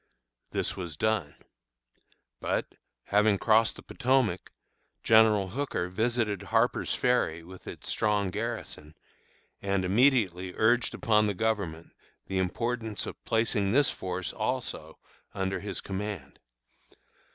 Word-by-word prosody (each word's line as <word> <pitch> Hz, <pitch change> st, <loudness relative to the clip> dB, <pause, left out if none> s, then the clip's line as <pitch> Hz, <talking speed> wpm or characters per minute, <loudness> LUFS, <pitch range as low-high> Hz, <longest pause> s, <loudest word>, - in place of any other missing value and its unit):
This -, -, -2 dB
was 85 Hz, -5 st, -6 dB
done. 110 Hz, -9 st, 0 dB, 1.0 s
But, -, -, -1 dB, 0.4 s
having 105 Hz, 0 st, +3 dB
crossed 110 Hz, +2 st, +3 dB
the -, -, -12 dB
Potomac, 125 Hz, -8 st, +1 dB, 0.5 s
General 110 Hz, -3 st, +5 dB
Hooker 110 Hz, -6 st, -2 dB
visited 110 Hz, 0 st, 0 dB
Harper's -, -, +1 dB
Ferry 85 Hz, -10 st, +1 dB
with 95 Hz, +2 st, -13 dB
its -, -, -7 dB
strong 105 Hz, -3 st, +1 dB
garrison, 105 Hz, -8 st, -5 dB, 0.7 s
and 100 Hz, -1 st, 0 dB
immediately 95 Hz, -5 st, +2 dB
urged 115 Hz, 0 st, +2 dB
upon 110 Hz, -4 st, +3 dB
the 100 Hz, -, -1 dB
Government 100 Hz, -6 st, -2 dB, 0.3 s
the 95 Hz, -1 st, -2 dB
importance 110 Hz, +3 st, -2 dB
of -, -, -8 dB
placing 110 Hz, -3 st, +1 dB
this 140 Hz, +1 st, +4 dB
force 90 Hz, -1 st, -4 dB
also -, -, -3 dB, 0.4 s
under 95 Hz, 0 st, -1 dB
his 100 Hz, -, -5 dB
command. 95 Hz, -7 st, -5 dB
105 Hz, 115 wpm, -29 LUFS, 95-115 Hz, 1.0 s, General